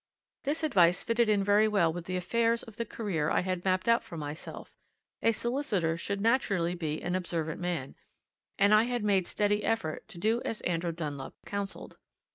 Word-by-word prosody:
This 295 +3 -1
advice 180 - +4
fitted 230 -1 +2
in 205 -2 +3
very 205 +2 +4
well 195 -7 +2
with 175 0 -6
the 185 0 -2
affairs 230 +5 +1
of 225 -1 -13
the 230 - -3
career 175 -11 -1
I - - +2
had 185 -1 -2
mapped 185 +2 +1
out 230 0 +4
for 170 - -9
myself 150 +1 -7 0.5
a 230 - +4
solicitor 225 - 0
should 200 +4 -3
naturally 200 -7 +2
be 160 -3 -3
an 175 - -1
observant 170 -3 -2
man, 175 -7 -2 0.6
and 200 +2 +5
I 215 +2 +6
had 245 -2 -2
made 195 -4 +2
steady 205 0 +1
effort 225 -9 -1
to 215 -5 -12
do 220 +6 +1
as 225 - -3
Andrew 170 -1 -1
Dunlop 150 -4 -5
counselled. 200 -1 -5
195 Hz, 185 wpm, -30 LUFS, 170-225 Hz, 0.6 s, I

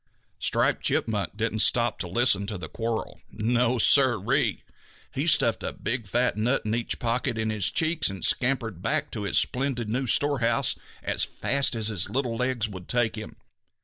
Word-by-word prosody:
Striped - - +1
Chipmunk 105 -2 -1
didn't 110 -1 -1
stop 120 +1 +2
to 90 - -3
listen 100 0 +2
to 105 -1 -4
the 90 - -7
quarrel. 115 -1 -4
No, 120 +2 +1
Sir 130 0 +4 0.2
ee! - - +1 0.5
He - - -2
stuffed - - +3
a - - -4
big 115 -2 -4
fat 125 +4 +1
nut 120 +6 +1
in 110 - -1
each 115 0 -1
pocket 120 0 -1
in 110 0 -1
his 105 -4 +1
cheeks 160 -4 +1
and 95 -1 -4
scampered 120 -8 0
back 110 - -1
to 105 -3 -4
his - - +1
splendid 125 -4 0
new 130 +3 -1
storehouse 125 -4 +2 0.3
as - - 0
fast 140 -2 0
as 110 -1 0
his 95 -4 -1
little 120 0 -1
legs 125 -2 -1
would 95 -4 -9
take 120 -3 +1
him. 110 -1 -8
115 Hz, 180 wpm, -26 LUFS, 110-125 Hz, 0.5 s, Sir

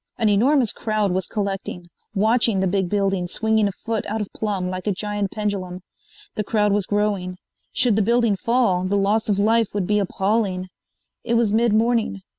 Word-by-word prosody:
An 225 -3 +2
enormous 245 +4 +3
crowd 215 -3 -1
was 185 0 -1
collecting, 195 -4 -4 0.3
watching 220 0 +2
the 190 - +1
big 190 -1 0
building 195 -3 0
swinging 220 +2 +1
a - - -2
foot 225 +3 -4
out 220 +2 -2
of 210 - -5
plumb 200 -4 -2
like 185 +2 -5
a - - +3
giant 205 0 -2
pendulum. 190 -4 -4 0.5
The 210 - -2
crowd 210 0 +1
was 205 -2 0
growing. 205 -3 -1 0.3
Should 240 -5 +2
the 215 - +2
building 235 0 +2
fall 230 -4 +1
the 195 +2 0
loss 210 +3 +1
of 200 - +2
life 225 +2 +3
would 200 -3 0
be 210 +2 +1
appalling. 195 -1 -1 0.5
It 235 - 0
was 230 -3 +2
mid 230 +1 +3
morning. 220 -2 +1
205 Hz, 185 wpm, -22 LUFS, 195-220 Hz, 0.5 s, enormous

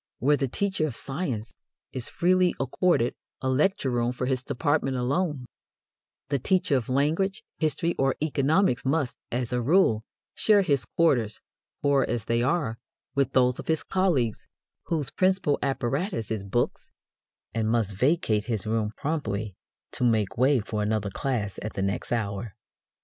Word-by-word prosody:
Where 145 +4 +3
the 140 -2 -1
teacher 190 +3 0
of 130 - -6
science 135 -7 -4 0.4
is 125 -2 -3
freely 180 0 +3
accorded 135 -1 +2 0.3
a 130 - -3
lecture 145 +1 +2
room 120 0 0
for 125 0 -3
his 130 -1 0
department 140 0 0
alone, 140 +2 -1 0.8
the 140 -1 +1
teacher 180 +1 +2
of 125 -3 -1
language, 160 +9 +1 0.2
history, 165 +2 +1
or 135 0 +2
economics 150 0 +2
must, 140 -1 0 0.2
as 125 0 -2
a 125 - +1
rule, 125 - +3 0.3
share 205 -2 +4
his 145 -7 +1
quarters, 125 -10 +1 0.4
poor 140 -1 +4
as 115 -3 -2
they 115 +1 +1
are, 125 -4 0 0.3
with 140 -1 +1
those 125 -1 +3
of - - -7
his 160 -1 +1
colleagues 165 - 0 0.4
whose 155 -5 -2
principal 185 -5 +2
apparatus 135 - -1
is 110 -3 -2
books, 110 +5 -1 0.6
and 110 -1 0
must 110 -3 +1
vacate 110 - +1
his 115 -3 -2
room 110 -1 -1
promptly 110 - -2 0.4
to - - -3
make 110 -5 +2
way 130 +2 +4
for 105 0 -3
another 105 -1 0
class 110 -7 -2
at 110 - -5
the 95 - -2
next 100 +1 -2
hour. 105 -2 -2
130 Hz, 155 wpm, -27 LUFS, 115-155 Hz, 0.8 s, share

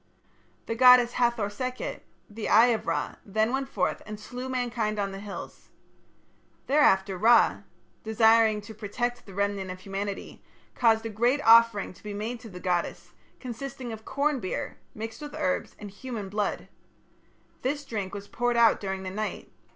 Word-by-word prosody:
The - - -2
goddess 250 0 +7
Hathor 235 -4 +1
Sekhet, 255 +4 -4 0.3
the 215 +1 -5
Eye 230 +3 +7
of 220 - -4
Ra, - - -2
then 220 +4 0
went 270 0 -1
forth - - -1
and 210 -1 -7
slew 250 +4 -7
mankind 235 -4 -1
on 200 -1 -1
the 195 - -7
hills. 200 -1 -9 1.0
Thereafter 195 -10 +3
Ra, 235 +4 +5 0.4
desiring 220 -1 +4
to 205 +2 -10
protect 240 +4 -3
the 195 - -11
remnant 200 -1 -1
of 185 0 -7
humanity, 195 +1 -5 0.3
caused 225 -2 +3
a - - -2
great 240 +6 +1
offering 230 -4 +6
to - - -19
be 210 -1 -6
made 225 +4 -4
to 225 - -11
the 180 -2 -9
goddess, 180 -2 -2 0.3
consisting 260 0 -6
of 220 0 -9
corn 280 +2 0
beer 185 -5 -4 0.2
mixed 225 +3 -6
with 295 0 -7
herbs 285 -3 -1
and 205 -1 -9
human 215 -2 -6
blood. 205 +1 -2 0.9
This 285 +3 -2
drink 205 -6 -4
was 200 0 -7
poured 245 0 0
out 230 -2 +5
during 190 -1 -4
the 185 - -5
night. 215 +2 -4
220 Hz, 165 wpm, -27 LUFS, 205-245 Hz, 1.0 s, goddess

